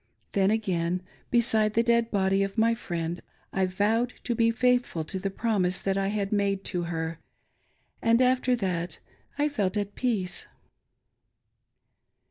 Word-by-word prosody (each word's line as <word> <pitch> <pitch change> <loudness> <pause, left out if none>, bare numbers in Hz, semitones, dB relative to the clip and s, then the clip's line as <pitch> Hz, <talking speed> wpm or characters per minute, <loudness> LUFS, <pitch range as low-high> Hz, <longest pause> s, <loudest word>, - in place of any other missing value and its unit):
Then 195 -2 +3
again, 180 -5 0 0.3
beside 220 -3 +3
the 230 - +4
dead 235 -1 +2
body 195 -1 +2
of 195 +2 -2
my 230 +1 +4
friend, 170 -6 -4 0.3
I 190 -1 +2
vowed 220 +6 +1
to 240 - 0
be 230 0 +3
faithful 245 -7 +1
to 190 +5 -4
the 195 +1 -2
promise 195 -3 +1
that 195 -1 -1
I 195 0 0
had 200 -1 -1
made 200 -2 +1
to 175 -1 -1
her; 165 -1 -3 0.8
and 230 +1 +4
after 255 0 +3
that 180 -6 -2 0.4
I 295 0 +2
felt 210 -9 -1
at 205 0 -2
peace. 210 -8 -1
200 Hz, 145 wpm, -27 LUFS, 185-230 Hz, 0.8 s, the